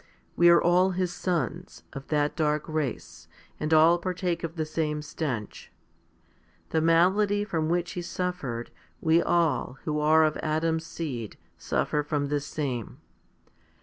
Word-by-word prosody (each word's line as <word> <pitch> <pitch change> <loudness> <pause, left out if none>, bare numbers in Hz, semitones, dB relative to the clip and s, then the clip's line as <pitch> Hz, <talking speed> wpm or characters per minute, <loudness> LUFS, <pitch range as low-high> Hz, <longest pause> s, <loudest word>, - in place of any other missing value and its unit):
We 175 0 +6
all 175 +2 +5
are - - -3
his 180 -1 -1
sons, 175 -1 -3
of 135 0 -8
that 150 -1 0
dark 150 -1 0
race, 155 -6 -4 0.3
and 155 +1 -2
all 160 +2 +6
partake 180 -1 -2
of 165 0 -4
the 160 -2 -2
same 155 -1 -2
stench. 135 -9 -5 1.0
The 160 - +1
malady 190 +5 +3
from 160 -6 -2
which 175 0 0
he 175 - -4
suffered, 175 -10 -4 0.3
we 160 +1 +3
all, 165 -6 +1
who 150 -1 -1
are 155 +1 +5
of 155 -1 +1
Adam's 160 +1 -1
seed, 125 -10 -5 0.2
suffer 150 - -1
from 145 -1 -2
the 145 0 +1
same. 140 -5 -4
160 Hz, 145 wpm, -27 LUFS, 150-175 Hz, 1.0 s, We